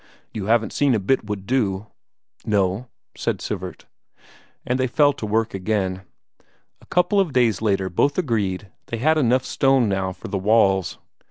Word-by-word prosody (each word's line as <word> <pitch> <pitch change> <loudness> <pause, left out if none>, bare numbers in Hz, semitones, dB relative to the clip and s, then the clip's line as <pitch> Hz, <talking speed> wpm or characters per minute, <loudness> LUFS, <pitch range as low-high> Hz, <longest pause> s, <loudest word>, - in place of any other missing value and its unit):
You 105 -3 -4
haven't 115 +1 +2
seen 140 -4 +2
a - - +1
bit 110 +4 0
would 100 -2 -4
do?" 105 -5 0 0.6
"No," 100 +3 0 0.3
said - - -2
Sivert. - - -6 0.8
And 125 +1 0
they 130 - +2
fell 145 +3 +3
to 110 - -6
work 110 +2 0
again. 95 -1 -1 0.8
A - - -20
couple 180 +3 +2
of 180 -7 +1
days 115 -6 +2
later 100 -3 +1
both 140 +11 +1
agreed 105 - -1 0.2
they 115 - -4
had 155 +7 +2
enough 130 -1 +2
stone 135 -3 +2
now 95 -1 -1
for - - -9
the 100 - -2
walls. 95 -3 +2
110 Hz, 165 wpm, -22 LUFS, 95-130 Hz, 0.8 s, fell